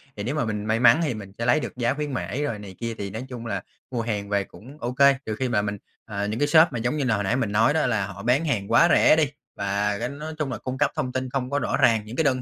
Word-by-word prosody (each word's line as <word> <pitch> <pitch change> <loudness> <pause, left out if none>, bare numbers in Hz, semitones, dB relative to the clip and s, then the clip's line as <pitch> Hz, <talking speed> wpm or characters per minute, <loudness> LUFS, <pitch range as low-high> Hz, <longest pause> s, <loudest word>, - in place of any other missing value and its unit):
thì 100 - -5
nếu 135 +7 -2
mà 150 - 0
mình 105 -1 -3
may 110 +1 +1
mắn 125 +6 +6
thì 145 -6 0
mình 100 -3 -8
sẽ 115 - -2
lấy 120 +5 +4
được - - -6
giá 120 +1 +1
khuyến 150 -1 -4
mãi 130 +3 -2
rồi 115 -8 -2
này 95 -2 -10
kia 115 -1 -3
thì 100 -1 -4
nói 110 +6 -6
chung 120 -2 -7
là 100 -4 -3 0.3
mua 120 -2 -1
hàng 105 -3 -3
về 100 -1 +1
cũng 130 +9 -14
OK. 120 +1 -4 0.3
Trừ 110 - -3
khi 130 0 -2
mà 105 -3 +2
mình, 105 0 -3 0.3
à, 100 -2 -3
những 105 +3 -3
cái 145 - +2
shop 160 0 +7
mà, 120 - -3
giống 120 +6 -1
như 145 - 0
là, 120 -4 +2
hồi 100 - -1
nãy 110 +6 +1
mình 115 -6 -1
nói 115 +7 +3
đó 160 - +2
là 105 -5 0
họ 100 +1 -9
bán 130 +7 +2
hàng 105 -9 -1
quá 170 - +6
rẻ - - +6
đi 155 -2 +3 0.3
và 100 +1 -1
cái - - -2
nói 150 +3 -7
chung 145 -4 -1
là 120 - -3
cung 130 +4 -5
cấp 145 +1 +2
thông 125 - -2
tin 130 0 -3
không 130 -1 -2
có 145 0 0
rõ - - -1
ràng. 110 -2 +3
Những 110 - -8
cái 160 - +1
đơn 130 -3 +1
120 Hz, 320 wpm, -24 LUFS, 105-135 Hz, 0.3 s, shop